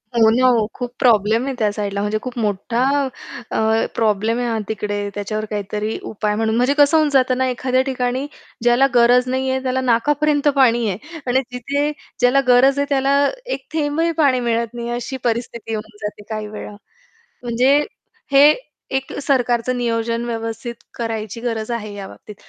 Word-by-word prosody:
हो 225 -1 +5
ना 245 +3 +3
हो, 235 -4 +3
खूप 245 -1 -5
प्रॉब्लेम 225 0 +3
आहे 275 - -2
त्या 210 -2 +2
साईडला 200 -1 -3
म्हणजे 210 +1 0
खूप 255 -1 -7
मोठा 220 +3 -1 0.7
अ, - - -1 0.4
प्रॉब्लेम 220 +1 +1
आहे 245 - -1
हा 230 -1 -1
तिकडे. 205 -1 -3
त्याच्यावर 215 +1 -3
काहीतरी 210 +1 -3
उपाय 210 -1 -2
म्हणून 220 0 0
म्हणजे 250 +4 +3
कसं 290 +2 +5
होऊन 310 -1 +3
जातं 260 -2 +2
ना, 260 0 +1
एखाद्या 255 +1 +1
ठिकाणी 255 0 -1 0.4
ज्याला 240 +3 +4
गरज 245 +1 +5
नाही 260 +1 -1
आहे, 260 0 -1
त्याला 260 0 0
नाकापर्यंत 290 +4 +2
पाणी 240 -4 +4
आहे 300 - -7
आणि 260 +2 +3
तिथे 280 +4 -1 0.3
ज्याला 250 +2 +4
गरज 260 +3 +5
आहे 285 - +2
त्याला 275 0 +2 0.3
एक 375 - -4
थेंबही 315 +2 0
पाणी 265 -4 +4
मिळत 235 -1 -1
नाही 235 0 -5
अशी 245 +3 -4
परिस्थिती 235 -1 -2
होऊन 215 0 -6
जाते 210 0 -6
काही 215 -1 -4
वेळा. 210 0 -8 0.7
म्हणजे 250 +4 +3 0.6
हे 280 +2 +8 0.5
एक 265 0 -2
अ, - - -5
सरकारचं 250 -2 +1
नियोजन 230 0 -1
व्यवस्थित 230 0 -4 0.2
करायची 225 -2 -4
गरज 230 -1 -3
आहे 215 -3 -4
या 195 -1 -7
बाबतीत. 210 - -12
240 Hz, 170 wpm, -20 LUFS, 220-260 Hz, 0.7 s, हे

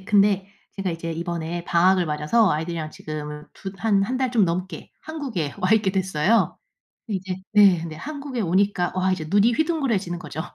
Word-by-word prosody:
네 190 - -16
근데 200 -2 +3 0.3
제가 195 -2 -2
이제 165 0 -4
이번에 170 0 -4
방학을 180 +1 +3
맞아서 155 +9 +2
아이들이랑 160 0 -2
지금 150 0 -7
두 190 - -7
한 200 -2 +2
한 255 +4 -2
달 260 -2 0
좀 220 -5 +4
넘게 180 +3 -4
한국에 260 - -4
와 185 +4 +2
있게 210 -3 +3
됐어요. 190 +2 +1 0.5
근데 205 -4 -1
이제 185 0 -5 0.2
네 200 -4 +6
근데 160 -2 -6
한국에 280 - -5
오니까 185 0 +1
와 185 0 +1
이제 160 -4 -4
눈이 205 +5 +4
휘둥그레지는 235 - 0
거죠. 160 -3 -6
190 Hz, 370 characters per minute, -23 LUFS, 170-210 Hz, 0.5 s, 네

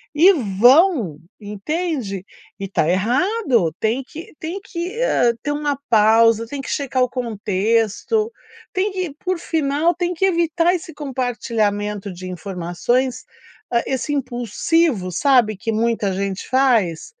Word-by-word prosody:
e 350 +6 +7
vão, 240 - +3 0.2
entende? 210 - -3 0.3
E 195 - -4
tá 160 -5 +1
errado, 240 - +1
tem 225 +4 +1
que 325 - -11
tem 350 +5 -5
que, 375 +4 -5
hã, 245 - +3
ter 290 - -1
uma 290 -1 -1
pausa, 225 +1 +5
tem 280 +2 -5
que - - -8
checar 265 -3 0
o 250 - 0
contexto, 225 - 0 0.4
tem 395 +1 0
que 365 -6 -3
por 370 -1 -1
final 315 +1 +1
tem 350 +1 -2
que 355 +2 -4
evitar 340 -1 +2
esse 340 -2 -5
compartilhamento 215 -7 -2
de 185 +1 -8
informações, 190 +8 -2 0.5
hã, 235 - +3
esse 265 +2 -2
impulsivo, 245 - 0
sabe, 215 +1 +3
que 225 +1 -3
muita 220 -3 0
gente 195 0 -3
faz? 235 -11 +2
245 Hz, 135 wpm, -20 LUFS, 210-325 Hz, 0.5 s, e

